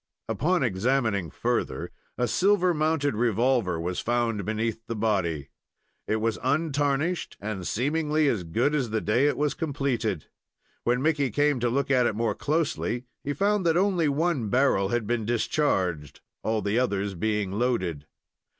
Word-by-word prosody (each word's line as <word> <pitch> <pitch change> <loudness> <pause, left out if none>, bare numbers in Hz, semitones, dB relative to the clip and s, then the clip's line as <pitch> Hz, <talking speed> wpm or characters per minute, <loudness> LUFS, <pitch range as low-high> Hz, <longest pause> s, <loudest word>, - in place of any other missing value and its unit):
Upon 175 +1 +1
examining 110 -3 0
further, - - -2 0.3
a 125 - +1
silver 185 - +3
mounted 155 -3 +1
revolver 115 -4 +1
was 90 +2 -2
found 120 -3 0
beneath 110 +1 -2
the 115 - -3
body. 90 -10 -1 0.6
It 110 - +1
was 110 0 -1
untarnished, 145 +3 0
and 100 -4 -4
seemingly 150 +4 +1
as 110 -9 0
good 115 - 0
as 135 -6 0
the 110 0 0
day 115 +7 +2
it 145 - 0
was 150 0 +1
completed. 130 - -2 0.6
When 125 +2 +1
Mickey 150 -4 +2
came 145 +3 +2
to 120 0 +1
look 140 +3 0
at 125 -2 +4
it 110 - -1
more 115 -1 0
closely, 145 -3 -1 0.2
he 145 - -2
found 200 +6 +1
that 165 0 +3
only 180 -5 +2
one 145 -6 0
barrel 120 -6 +2
had 120 -1 0
been 120 +1 -1
discharged, 95 - 0 0.2
all 110 -2 -1
the 105 +4 +1
others 100 -5 0
being 105 +1 -1
loaded. 95 - -1
120 Hz, 155 wpm, -26 LUFS, 105-145 Hz, 0.6 s, at